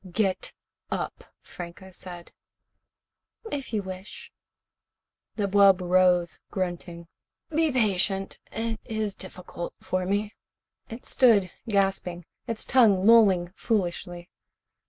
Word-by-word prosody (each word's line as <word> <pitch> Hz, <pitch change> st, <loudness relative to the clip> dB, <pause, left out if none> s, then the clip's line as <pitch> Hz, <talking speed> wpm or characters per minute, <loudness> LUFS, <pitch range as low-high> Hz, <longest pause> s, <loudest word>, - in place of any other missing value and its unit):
"Get 195 Hz, 0 st, 0 dB, 0.4 s
up," -, -, -4 dB, 0.2 s
Franco 180 Hz, +2 st, -9 dB
said. 175 Hz, -1 st, -10 dB, 1.2 s
"If 275 Hz, -4 st, -4 dB
you 210 Hz, -3 st, -1 dB
wish." 190 Hz, +1 st, -9 dB, 1.0 s
The 210 Hz, -, 0 dB
wub 200 Hz, -1 st, +6 dB
rose, 180 Hz, -2 st, +3 dB
grunting. 175 Hz, -2 st, -4 dB, 0.4 s
"Be 320 Hz, 0 st, +2 dB
patient. 195 Hz, -5 st, 0 dB
It 225 Hz, -1 st, -3 dB
is 220 Hz, -2 st, -2 dB
difficult 180 Hz, -2 st, -8 dB
for 185 Hz, 0 st, -2 dB
me." 205 Hz, +2 st, -1 dB, 0.6 s
It 230 Hz, +2 st, -9 dB
stood, 210 Hz, -8 st, +4 dB, 0.2 s
gasping, 195 Hz, -4 st, 0 dB, 0.2 s
its 230 Hz, -2 st, -2 dB
tongue 210 Hz, -7 st, +4 dB
lolling 195 Hz, -6 st, +5 dB
foolishly. 175 Hz, -4 st, -2 dB
195 Hz, 100 wpm, -26 LUFS, 180-215 Hz, 1.2 s, wub